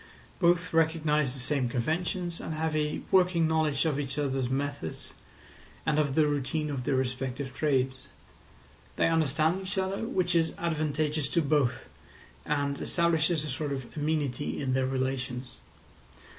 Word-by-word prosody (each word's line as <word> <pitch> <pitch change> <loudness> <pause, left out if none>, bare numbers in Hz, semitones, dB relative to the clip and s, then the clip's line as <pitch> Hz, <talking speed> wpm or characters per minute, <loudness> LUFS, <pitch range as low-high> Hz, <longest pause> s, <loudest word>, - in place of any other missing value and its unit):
Both 175 0 +3
recognise 155 -4 +2
the - - -6
same 130 -1 0
conventions, 170 - -1
and 160 - -4
have 160 0 -1
a 150 0 0
working 180 -3 +4
knowledge 155 -2 +1
of 150 -3 +1
each 140 -1 -3
other's 135 -3 0
methods 140 - -3 0.7
and 155 -2 +2
of 140 -3 +1
the 155 - +5
routine 150 +1 -1
of 130 -3 -3
their 140 - +1
respective 130 +1 -2
trades. 130 -3 +1 1.0
They - - +3
understand 160 +2 +2
each 190 +1 -2
other, 190 +3 -1
which 185 -7 0
is 165 -2 +2
advantageous 155 -3 0
to 165 +2 +2
both, 140 -4 +1 0.6
and 145 -1 0
establishes 165 -2 +1
a - - -5
sort 145 +2 -3
of 135 -3 -5
amenity 150 -3 -1
in 130 -2 -1
their 130 0 +1
relations. 130 -1 -2
150 Hz, 145 wpm, -29 LUFS, 135-160 Hz, 1.0 s, the